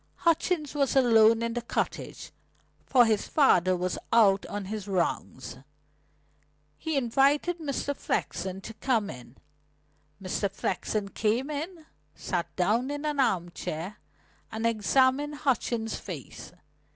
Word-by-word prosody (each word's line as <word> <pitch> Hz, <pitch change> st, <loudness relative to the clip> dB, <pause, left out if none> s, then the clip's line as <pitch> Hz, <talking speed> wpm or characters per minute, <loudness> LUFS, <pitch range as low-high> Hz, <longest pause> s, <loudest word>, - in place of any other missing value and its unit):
Hutchings 330 Hz, -2 st, +1 dB
was 280 Hz, -3 st, +1 dB
alone 230 Hz, -3 st, +5 dB
in 230 Hz, 0 st, -1 dB
the 240 Hz, -, -2 dB
cottage, 235 Hz, -, -4 dB, 0.6 s
for 245 Hz, -2 st, +6 dB
his 215 Hz, -2 st, +1 dB
father 185 Hz, -, +4 dB
was 180 Hz, 0 st, -2 dB
out 200 Hz, -4 st, +4 dB
on 205 Hz, -1 st, -5 dB
his 210 Hz, +1 st, -5 dB
rounds. 185 Hz, -4 st, -2 dB, 1.2 s
He 320 Hz, -3 st, -2 dB
invited 275 Hz, +7 st, +2 dB
Mr. 285 Hz, -2 st, -2 dB
Flexen 185 Hz, -4 st, -3 dB
to 225 Hz, -, -8 dB
come 225 Hz, -3 st, 0 dB
in. 125 Hz, 0 st, -12 dB, 0.8 s
Mr. 195 Hz, +1 st, -2 dB
Flexen 200 Hz, +1 st, -2 dB
came 230 Hz, +8 st, 0 dB
in, 320 Hz, +3 st, -5 dB, 0.3 s
sat 175 Hz, -3 st, -2 dB
down 220 Hz, +8 st, +1 dB
in 290 Hz, +1 st, -4 dB
an 295 Hz, -2 st, -1 dB
arm 175 Hz, -9 st, +1 dB
chair, 175 Hz, +6 st, -5 dB, 0.5 s
and 220 Hz, +1 st, -3 dB
examined 260 Hz, +6 st, +2 dB
Hutchings' 235 Hz, -5 st, -1 dB
face. -, -, -8 dB
230 Hz, 125 wpm, -28 LUFS, 195-280 Hz, 1.2 s, for